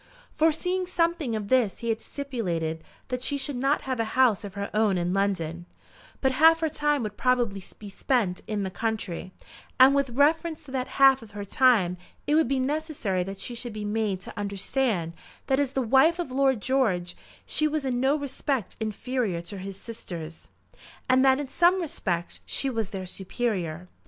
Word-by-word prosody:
Foreseeing 355 +4 +1
something 335 -8 0
of 210 -2 -3
this 240 -4 +2
he - - -1
had 225 0 0
stipulated 175 - -3 0.3
that 250 -1 -2
she 285 +2 +1
should 270 -2 -3
have 270 -2 0
a - - +3
house 240 -6 +4
of 200 -1 -8
her 200 0 -4
own 210 -3 +2
in 175 +1 0
London; 175 -4 -1 0.5
but 265 - +3
half 325 +5 +5
her 320 - +1
time 295 -3 0
would 210 -1 -5
probably 235 -6 +1
be 210 - -10
spent 200 -2 0
in 210 -2 -2
the 190 - -3
country, 210 -5 -3 0.5
and 260 +2 +8
with 280 -1 +1
reference 315 +5 +1
to 280 - -12
that 255 -1 -2
half 270 -1 +6
of 225 - -12
her 205 - -4
time 200 -6 +3 0.3
it 295 - +1
would 315 -2 +4
be 270 +1 0
necessary 280 - -1
that 195 +2 -5
she 245 - -4
should 235 -1 -6
be 210 -1 -5
made 210 -2 -1
to - - -9
understand 200 -2 -1 0.3
that 265 0 +1
as 280 -2 0
the 265 - 0
wife 270 +8 +4
of 345 -7 -4
Lord 265 -3 +2
George 210 -10 +1 0.3
she 305 - +1
was 305 -2 -2
in 250 -2 0
no 270 +3 +3
respect 275 -5 -3
inferior 220 -3 -2
to 190 +3 -7
his 195 0 -7
sisters, 170 -8 -8 0.6
and 260 0 +4
that 265 0 +5
in 290 - -3
some 350 +6 +3
respects 200 - -3
she 275 - 0
was 225 -5 -2
their 190 -3 -5
superior. 185 -4 -3
245 Hz, 185 wpm, -26 LUFS, 195-275 Hz, 0.6 s, and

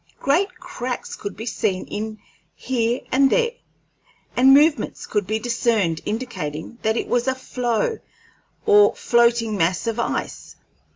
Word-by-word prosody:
Great 345 +9 +2
cracks 255 -9 -5
could 205 - -7
be 220 - -6
seen 190 -5 -1
in 215 +1 -4
it - - -16 0.4
here 240 0 -1
and 270 +1 +4
there, 470 - +2 0.8
and 260 +2 +6
movements 295 +3 +3
could 205 -3 -1
be 215 +2 0
discerned 220 -7 0
indicating 215 -5 -5
that 220 +1 +1
it - - -2
was 245 +1 0
a 260 - +1
floe, 250 - -1 0.7
or 415 -1 +6
floating 235 -2 +2
mass 180 +2 0
of 230 0 -2
ice. - - -3
235 Hz, 140 wpm, -22 LUFS, 215-265 Hz, 0.8 s, and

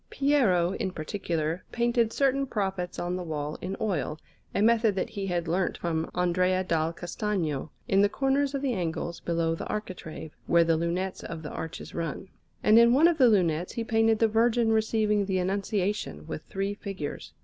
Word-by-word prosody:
Piero, 235 -12 +2
in 195 0 -2
particular, 165 -1 -3
painted 235 -1 +1
certain 275 +1 +1
prophets 190 -6 -2
on 175 +1 -2
the 180 - -4
wall 150 -2 -4
in 190 +1 -4
oil 175 -7 -1 0.4
(a - - +2
method 220 -1 +4
that 190 - -2
he 200 -2 -4
had 175 -2 -1
learnt 180 +3 0
from 165 -1 -2
Andrea 180 +1 +2
dal 165 -3 0
Castagno), 175 -4 -3 0.2
in 195 0 +4
the 205 - +4
corners 275 +3 +1
of 275 - -3
the 265 -3 +1
angles 170 -2 -3
below 165 -1 0
the 165 - -5
architrave, 180 -7 -6
where 170 0 +5
the 165 0 +2
lunettes 175 +3 -2
of 165 -1 -6
the 150 - -6
arches 165 - -6
run; 165 +3 -4 0.3
and 215 +2 +7
in 235 +1 +6
one 310 +5 +6
of 340 -2 +1
the 255 -3 +7
lunettes 175 -5 +1
he 230 - -2
painted 225 0 +3
the 225 - +4
Virgin 225 +1 +2
receiving 215 -2 +2
the 190 -1 0
Annunciation, 195 +1 -1
with 155 -1 -5
three 195 +1 -2
figures. 195 -8 -6
190 Hz, 180 wpm, -28 LUFS, 170-225 Hz, 0.4 s, and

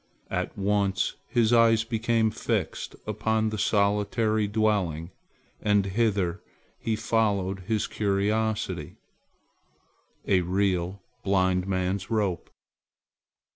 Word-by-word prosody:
At - - -2
once 100 -1 +1
his 120 -1 +2
eyes 115 -1 +5
became 115 -1 +1
fixed - - -2
upon 110 0 0
the 110 - -3
solitary 105 +1 +1
dwelling 100 -6 0 0.5
and 105 -2 +3
hither 100 -3 0 0.4
he 110 - -1
followed 100 -4 0
his 110 -2 +1
curiosity, 105 +2 -1 1.3
a 95 -2 +3
real 90 0 0 0.2
blind 95 -1 +2
man's 95 0 -1
rope. 100 -6 -1
100 Hz, 95 wpm, -27 LUFS, 95-110 Hz, 1.3 s, eyes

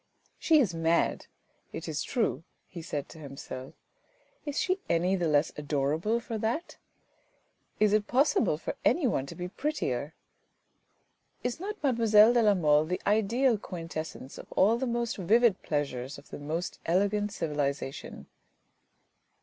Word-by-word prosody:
" - - -39
She 320 - +8
is 215 -11 +2
mad, 165 +1 +1 0.4
it 165 - -6
is 150 -3 -2
true," 215 - -1 0.2
he 175 - -8
said 150 -4 -4
to 160 - -12
himself. 135 -2 -8 0.4
" - - -38
Is 290 - -1
she 370 +1 0
any 180 +3 +2
the 175 -3 0
less 150 0 +2
adorable 150 +9 0
for 230 -2 -5
that? 235 +11 -2 1.0
Is 210 -1 +4
it 210 0 +2
possible 255 - +2
for 165 - -5
anyone 240 - +2
to - - -8
be 180 0 -4
prettier? 170 - -3 1.3
Is 245 +4 -2
not 410 +4 -4
mademoiselle 230 -4 +5
de 240 - +4
la 210 -2 +4
Mole 150 -3 +3
the 180 +3 -3
ideal 220 +3 +2
quintessence 165 -7 -7
of - - -12
all 220 +5 +4
the 260 - -1
most 235 -1 -1
vivid 215 +2 +3
pleasures 140 -3 -3
of - - -15
the - - -7
most 160 +4 -4
elegant 205 +4 +1
civilisation?" 145 -5 -3
185 Hz, 150 wpm, -29 LUFS, 155-235 Hz, 1.3 s, She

